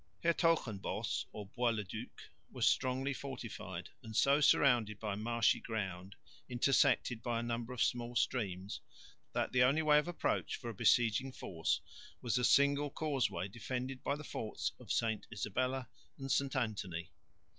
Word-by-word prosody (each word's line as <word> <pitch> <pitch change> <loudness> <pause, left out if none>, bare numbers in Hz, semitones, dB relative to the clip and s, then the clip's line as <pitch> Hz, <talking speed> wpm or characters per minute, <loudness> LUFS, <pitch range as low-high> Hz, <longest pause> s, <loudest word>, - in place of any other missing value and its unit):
Hertogenbosch, 165 - +1
or 105 - -7
Bois 120 +5 0
le 110 -2 -1
duc, 95 - -8 0.3
was - - 0
strongly 130 +2 +2
fortified, 115 -10 -6
and 110 -3 -9
so 140 +5 +4
surrounded 120 -8 +4
by 105 -2 -2
marshy 115 +2 +2
ground, 95 -3 -4 0.3
intersected 125 -1 +3
by 120 -1 -1
a - - -3
number 120 +1 -3
of 125 - +1
small 120 0 -1
streams, 100 -6 -1 0.5
that - - 0
the 125 - +3
only 140 +6 +4
way 150 -1 +6
of 150 - -3
approach 175 - -1
for 120 -2 -6
a - - -9
besieging 120 +5 +3
force 80 -9 -1 0.4
was 120 -1 0
a - - -1
single 140 +3 +4
causeway 130 - -1
defended 125 +4 -5
by 140 - 0
the 150 - -8
forts 110 -6 -3
of - - -7
St 110 -2 0
Isabella 125 +4 -1 0.3
and 135 -2 -4
St 140 -1 +1
Anthony. 100 -9 -2
120 Hz, 155 wpm, -35 LUFS, 105-135 Hz, 0.5 s, way